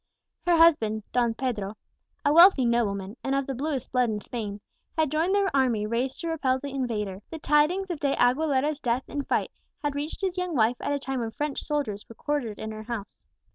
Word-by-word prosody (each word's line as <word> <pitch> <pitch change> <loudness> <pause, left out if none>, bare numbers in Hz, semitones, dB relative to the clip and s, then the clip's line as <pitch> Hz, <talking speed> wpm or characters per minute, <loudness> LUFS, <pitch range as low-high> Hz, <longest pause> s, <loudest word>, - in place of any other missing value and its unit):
Her 345 -1 +5
husband, 225 -11 +4
Don 235 -2 +1
Pedro, 220 -6 -3 0.5
a 285 - +4
wealthy 335 -5 +8
nobleman, 210 -3 0
and 270 0 0
of 275 0 0
the 270 - -3
bluest 270 0 -3
blood 250 -2 +2
in 210 -1 -2
Spain, 210 -2 -5 0.4
had 315 -3 +2
joined 330 +6 +2
the 400 -1 +2
army 250 -6 +2
raised 240 +4 -2
to 335 - -3
repel 270 -5 +1
the 280 +1 -6
invader. 210 -7 -2
The 325 - -6
tidings 315 +6 +2
of 330 - -4
De 280 -1 +1
Aguilera's 280 +3 +2
death 245 -1 0
in 285 -1 -3
fight - - 0 0.3
had 290 -1 0
reached 290 +6 -4
his 375 -1 -1
young 360 -3 -2
wife 235 0 +3
at - - -2
a 285 - +1
time 270 -2 -3
when 230 -2 -2
French 290 +4 -3
soldiers 265 -9 -3
were 230 - -11
quartered 265 -8 -2
in 220 - -5
her 215 0 -7
house. 220 -2 -7
265 Hz, 210 wpm, -27 LUFS, 230-300 Hz, 0.5 s, wealthy